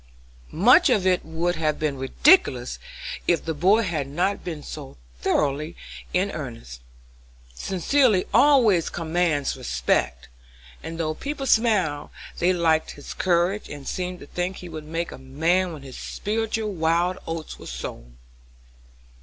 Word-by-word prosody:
Much 250 - +6
of 210 -7 +2
it 185 -1 +2
would 165 +2 -1
have 155 -1 0
been 150 -2 -1
ridiculous 135 - +3 0.5
if 170 - +2
the 165 - -1
boy 195 +9 +3
had 160 -8 -2
not 180 +8 -1
been 160 -4 -5
so 145 -3 -8 0.2
thoroughly 150 - 0 0.4
in 190 +2 +1
earnest; 115 - -7 0.7
sincerity 195 - +2
always 235 - +5
commands 165 -3 0
respect, - - -1 0.5
and 165 0 -7
though 155 -1 0
people 275 - -5
smiled, 205 - +2 0.3
they 175 +2 +3
liked 165 -3 +2
his 145 - -9
courage, 180 +3 +1
and 145 -2 -8
seemed 180 -1 -3
to - - -10
think 180 +5 -3
he 180 - -9
would 155 -2 -7
make 165 +2 -3
a - - -9
man 165 +8 +1
when 150 -4 -9
his 130 -2 -9
spiritual 220 0 -2
wild 170 +2 +1
oats 165 -1 -5
were - - -10
sown." - - -7
170 Hz, 140 wpm, -24 LUFS, 150-190 Hz, 0.7 s, Much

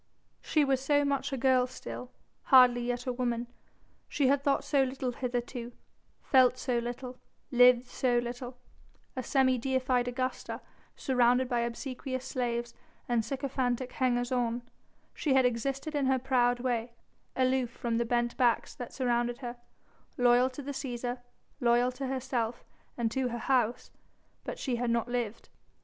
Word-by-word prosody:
She 305 -2 +2
was 270 -1 +1
so 290 +1 +3
much 280 0 -1
a 270 - -2
girl 255 0 +3
still 250 0 -8 0.4
hardly 250 -2 +7
yet 245 0 -2
a 250 - -1
woman 240 -1 -1 0.6
she 275 -3 +2
had 280 0 +3
thought 280 -1 +2
so 285 -1 +2
little 260 -1 -1
hitherto, 245 -1 -4 0.5
felt 255 -2 +4
so 250 -2 0
little, 245 +2 -6 0.3
lived 250 0 +6
so 245 -1 0
little; 245 +1 -4 0.6
a 260 - -2
semi 260 0 +2
deified 255 -1 +1
Augusta, 255 +1 -3 0.4
surrounded 250 -1 +2
by 245 -1 0
obsequious 255 +2 -4
slaves 240 -3 -2 0.3
and 235 -2 +1
sycophantic 255 -1 -2
hangers 245 -1 0
on, 240 -1 0 0.5
she 280 -4 0
had 260 -1 +5
existed 270 +5 -1
in 285 -3 +1
her 265 0 +3
proud 245 -1 +2
way, 240 -2 -1 0.4
aloof 255 -1 +2
from 235 -1 -2
the - - +2
bent 240 0 0
backs 245 -3 +2
that 245 - -7
surrounded 240 -2 0
her 245 -2 -6 0.6
loyal 245 +1 +4
to 265 +2 -8
the 285 - -4
Cæsar, 245 -2 -4 0.4
loyal 240 0 +3
to 260 +1 -5
herself 250 -3 -2 0.3
and 230 -2 0
to 265 0 0
her 240 -1 -3
House 245 -1 0 0.5
but - - -5
she 250 -4 -2
had 240 0 -1
not 235 0 +1
lived. 240 -3 -3
250 Hz, 155 wpm, -30 LUFS, 240-260 Hz, 0.6 s, hardly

